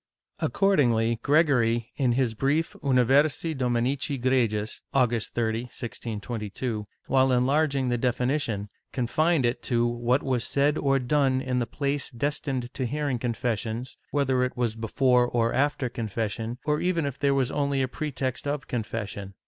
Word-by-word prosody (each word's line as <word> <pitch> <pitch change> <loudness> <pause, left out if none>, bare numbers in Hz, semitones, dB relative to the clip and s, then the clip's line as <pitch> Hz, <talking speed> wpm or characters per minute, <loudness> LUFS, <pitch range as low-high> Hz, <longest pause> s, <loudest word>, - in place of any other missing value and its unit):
Accordingly 115 - +2
Gregory, 125 -7 +2
in 130 -4 +2
his 125 -2 +1
brief 145 +8 0
Universi 140 +4 +3
Dominici 130 +3 0
Gregis, 115 -4 0
August 120 -4 +1
30, 115 0 0
1622, 110 -2 -5 0.2
while 130 0 +3
enlarging 135 +1 +2
the 120 -1 0
definition, 125 -4 0 0.2
confined 145 +4 +1
it 120 +1 0
to 120 -2 +1
what 120 +2 +1
was 130 -4 0
said 145 +2 +2
or 135 -1 +2
done 135 0 +2
in 130 -1 -1
the 120 - -1
place 140 +3 -2
destined 130 -1 -3
to 130 - -2
hearing 140 -1 -1
confessions, 120 0 -2
whether 135 -3 +1
it 125 - -2
was 120 -3 0
before 125 +2 +2
or 115 -1 +1
after 140 -1 +1
confession, 115 0 -3
or 150 0 +1
even 175 -4 +1
if 140 -1 -4
there 140 -1 +2
was 130 -2 +1
only 140 -2 0
a - - 0
pretext 135 -1 -3
of 145 -1 -2
confession. 105 -4 -4
125 Hz, 145 wpm, -26 LUFS, 115-140 Hz, 0.2 s, Universi